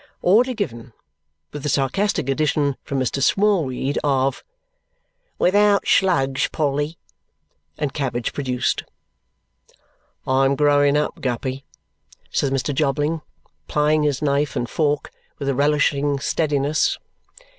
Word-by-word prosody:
Order 245 +7 +4
given; 125 - -5 0.6
with 145 - -6
the 150 - -2
sarcastic 145 +7 0
addition 145 0 +1
(from 140 - -3
Mr. 130 +2 -1
Smallweed) 150 -8 +1
of 135 -2 0 0.9
"Without 205 +2 +3
slugs, 135 -8 +2
Polly!" 145 +1 -1 0.8
And 145 -3 -2
cabbage 130 -5 -2
produced. 125 -3 -1 1.4
"I 130 +1 +2
am 135 +1 +2
growing 145 0 +3
up, 150 - -2
Guppy," 130 +2 -3 0.7
says 140 - +1
Mr. 135 +2 -1
Jobling, 150 +3 0 0.5
plying 150 +1 +2
his 150 -1 0
knife 140 0 0
and 120 - -1
fork 145 +1 -1 0.3
with 140 - -5
a 140 - +2
relishing 145 0 +1
steadiness. 145 0 0
145 Hz, 115 wpm, -21 LUFS, 135-150 Hz, 1.4 s, Order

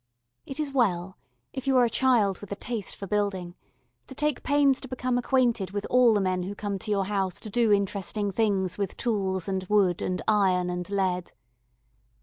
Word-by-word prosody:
It 270 - -6
is 300 -2 -2
well, 190 -8 0 0.4
if 270 0 -6
you 265 -1 +4
are 245 - +6
a - - +2
child 230 -6 +2
with 205 - -10
a - - -1
taste 225 -1 -4
for 195 - -7
building, 195 -3 -1 0.5
to 265 - -9
take 300 -1 0
pains 285 -2 +3
to 265 - -7
become 255 -1 -2
acquainted 245 -5 +1
with 205 +1 -4
all 245 -3 +5
the - - +3
men 185 -1 0
who 195 +3 -5
come 200 -1 -3
to 215 - -6
your 200 -2 +1
house 195 -2 -2
to 215 - -8
do 230 -1 +2
interesting 200 0 0
things 195 -3 0
with 200 -2 -3
tools 190 -6 -1
and 190 -1 -1
wood 190 -3 +2
and 185 0 -2
iron 185 -4 +2
and 180 0 -4
lead. 185 -3 -1
205 Hz, 195 wpm, -27 LUFS, 190-245 Hz, 0.5 s, are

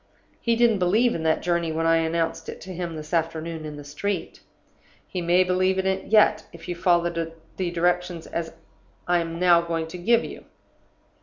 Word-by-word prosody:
He 235 -1 +1
didn't 230 -3 +3
believe 215 +7 +3
in 165 - -3
that 160 0 +1
journey 170 -2 0
when 165 +1 -1
I 165 0 +4
announced 165 0 -1
it - - -7
to 185 +2 -8
him 170 -2 -4
this 155 +1 -8
afternoon 165 -1 -2
in 150 -1 -6
the 145 - -8
street. 155 +8 -4 0.7
He 180 - -4
may 175 +2 +4
believe 185 +1 +1
in 190 - 0
it 190 0 0
yet, 210 0 +4
if 170 - -12
you 175 - -3
follow 175 -1 +3 0.5
the 185 -2 -1
directions 175 0 0 0.8
I 175 0 +3
am 165 0 -4
now 175 -2 +5
going 165 -1 -2
to 180 +2 -8
give 235 +6 +3
you. - - -9
175 Hz, 185 wpm, -25 LUFS, 165-185 Hz, 0.8 s, now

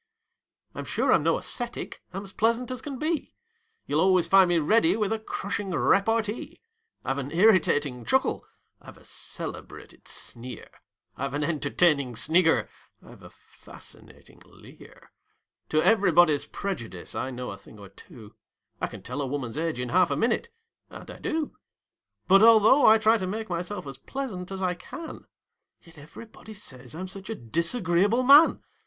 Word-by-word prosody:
I'm - - -6
sure - - +1
I'm - - +4
no - - +1
ascetic: 240 -1 -4
I'm 195 +2 -6
as 195 -1 -11
pleasant 230 +3 0
as 255 - -5
can 280 -3 -6
be; 310 +3 -3 0.5
You'll 150 +2 0
always 185 -2 +3
find 190 0 +5
me 175 - +2
ready 225 - +3
with 215 -1 0
a 225 - -3
crushing 205 -2 -4
repartee; 210 +5 0 0.5
I've 135 +1 -1
an 140 0 -5
irritating 155 - +3
chuckle; 110 - 0 0.4
I've - - -14
a - - -19
celebrated - - -8
sneer; 120 0 -5 0.4
I've 140 +1 -4
an 145 - -1
entertaining 145 -3 +1
snigger; 160 +7 +2 0.4
I've - - -15
a - - -12
fascinating - - -16
leer; - - -17 0.6
To 155 0 +2
everybody's 175 -8 +4
prejudice 115 - -6
I 130 - -3
know 125 -2 -6
a 100 - -8
thing 105 - -16
or 100 -2 -12
two; 110 - -15 0.5
I - - 0
can - - -11
tell 125 +5 -4
a 140 - -2
woman's 130 -4 -4
age 160 -3 -2
in 125 -1 -3
half 180 +2 +3
a 140 - 0
minute 240 - 0 0.4
and - - -11
I - - -12
do 320 -3 -3 0.7
But 195 +1 +6
although 225 +4 +6
I 220 - +8
try 220 +1 +3
to 185 - -3
make 215 +1 -5
myself 175 +2 -4
as 135 -1 -9
pleasant 195 - -6
as 190 0 -4
I 180 -1 +1
can, 315 - -10 0.6
Yet 165 -3 -16
everybody 215 +8 -13
says 130 - -10
I'm 185 +3 -5
such 195 +2 -10
a 225 - -3
disagreeable 175 - 0
man! 285 +5 +6
180 Hz, 160 wpm, -26 LUFS, 145-220 Hz, 0.7 s, I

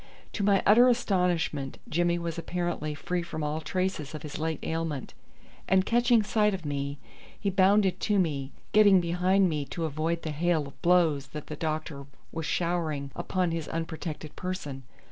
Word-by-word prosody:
To 205 - -2
my 200 -1 +3
utter 240 +5 +7
astonishment 180 - 0
Jimmy 175 +1 +1
was 170 -1 -4
apparently 175 -3 -3
free 175 +4 -2
from 160 -2 -5
all 150 +2 -2
traces 180 -4 -2
of 150 - -7
his 150 0 -6
late 160 0 -1
ailment, 160 -4 -3 0.5
and 190 0 +3
catching 235 -1 +4
sight 210 -1 +2
of 180 -4 -8
me 140 0 -3 0.4
he 200 - 0
bounded 190 +1 +4
to 210 -1 +1
me, 145 -7 0 0.2
getting 205 -3 +7
behind 180 +3 +2
me 150 -4 -1
to 165 +3 -4
avoid 160 +2 -2
the 155 - -3
hail 160 0 +1
of 140 - -13
blows 165 -6 +3
that 150 +1 -7
the 150 - -6
doctor 155 -3 -4 0.2
was 160 -2 -4
showering 160 -5 -1
upon 180 -3 -1
his 165 -2 -3
unprotected 160 -2 -5
person. 180 -7 -5
170 Hz, 165 wpm, -28 LUFS, 150-185 Hz, 0.5 s, utter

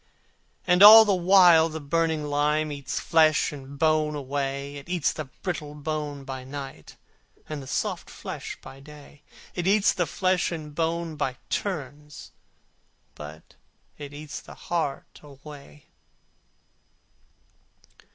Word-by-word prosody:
And 180 0 +3
all 220 +2 +11
the 205 - +2
while 175 -3 +6
the 160 0 -6
burning 160 +1 -1
lime 150 +1 0
Eats 140 -1 -4
flesh 155 -2 +3
and 140 -1 -10
bone 155 0 +1
away, 140 0 -4
It 140 +4 -12
eats 175 -5 0
the 155 - -6
brittle 150 0 -6
bones 150 -2 -5
by 130 -1 -6
night, 135 - -9 0.5
And 150 -2 -6
the 135 - -11
soft - - -3
flesh - - -7
by 135 - -12
day, 145 0 -15 0.3
It 175 0 -3
eats 200 +1 +4
the 175 -4 -1
flesh 185 +2 0
and 155 -3 -7
bone 165 0 -2
by 130 -4 -2
turns, 150 -5 -5 0.8
But 75 +1 -11 0.5
it 145 -1 -8
eats 150 0 -8
the - - -13
heart 160 -5 -4
alway. 145 0 -14
150 Hz, 130 wpm, -25 LUFS, 140-165 Hz, 0.8 s, all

